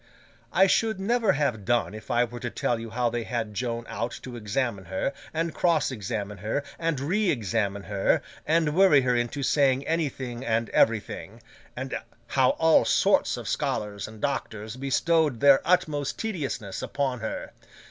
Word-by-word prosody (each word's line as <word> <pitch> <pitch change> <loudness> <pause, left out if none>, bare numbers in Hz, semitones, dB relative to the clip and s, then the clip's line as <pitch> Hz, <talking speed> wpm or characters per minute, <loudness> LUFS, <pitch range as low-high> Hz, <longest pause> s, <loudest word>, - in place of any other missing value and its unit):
I 190 - +5
should 220 +1 +2
never 220 0 +2
have 130 -8 0
done 120 +1 +1
if 110 - -10
I 120 +1 +3
were 120 0 -6
to 120 - -3
tell 120 0 -1
you 115 0 -7
how 120 +1 0
they 120 0 -2
had 115 -3 -3
Joan 120 +1 -3
out 115 - -3
to 125 -1 -7
examine 110 -2 -2
her, 95 +10 -2 0.2
and 165 0 -2
cross 165 -5 +2
examine 105 -3 -4
her, 110 +8 -2 0.2
and 165 -4 0
re 185 +8 +1
examine 100 - -1
her, 100 -1 +1 0.2
and 160 -1 +2
worry 185 -7 +6
her 125 -1 +1
into 120 +4 -1
saying 135 -1 +2
anything 130 -7 -2
and 115 -2 0
everything; 115 -2 +1 0.4
and - - -5 0.4
how 130 -2 +4
all 160 -1 +5
sorts - - +3
of - - -7
scholars 105 -1 -2
and 110 0 -12
doctors 110 -6 -3
bestowed 140 +1 +1
their 140 0 +6
utmost 150 -5 +1
tediousness 140 - -3
upon 135 -3 -2
her. 110 0 -5
125 Hz, 165 wpm, -26 LUFS, 110-150 Hz, 0.4 s, worry